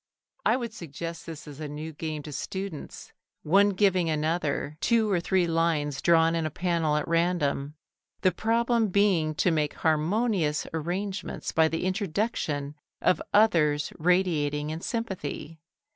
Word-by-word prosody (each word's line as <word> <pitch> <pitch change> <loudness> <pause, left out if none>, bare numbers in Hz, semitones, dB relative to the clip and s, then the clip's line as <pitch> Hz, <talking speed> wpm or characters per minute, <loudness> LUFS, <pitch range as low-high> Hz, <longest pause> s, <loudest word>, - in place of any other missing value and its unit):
I - - +3
would 235 -3 -5
suggest 165 -2 -7
this 160 -2 -8
as 145 -1 -10
a 155 - -4
new 155 +2 -6
game 155 -1 -4
to 150 - -8
students, 190 +2 -6 0.3
one 200 +6 +5
giving 185 -3 +2
another 155 -2 -1
two 225 -3 +2
or 180 - +3
three 180 +1 +1
lines 165 -4 0
drawn 165 -1 +4
in 165 -1 0
a 155 - -1
panel 165 -1 0
at 150 - -1
random, 165 -4 0 0.5
the 185 - +4
problem 230 +3 +1
being 180 -6 +2
to 180 - +2
make 150 -2 0
harmonious 160 0 +1
arrangements 185 +5 -3
by 160 0 +4
the 165 +2 -2
introduction 185 -7 -1 0.3
of 180 - +2
others 155 -9 +3
radiating 155 -4 +1
in 160 +1 -5
sympathy. 180 -9 -4
165 Hz, 145 wpm, -27 LUFS, 150-190 Hz, 0.5 s, one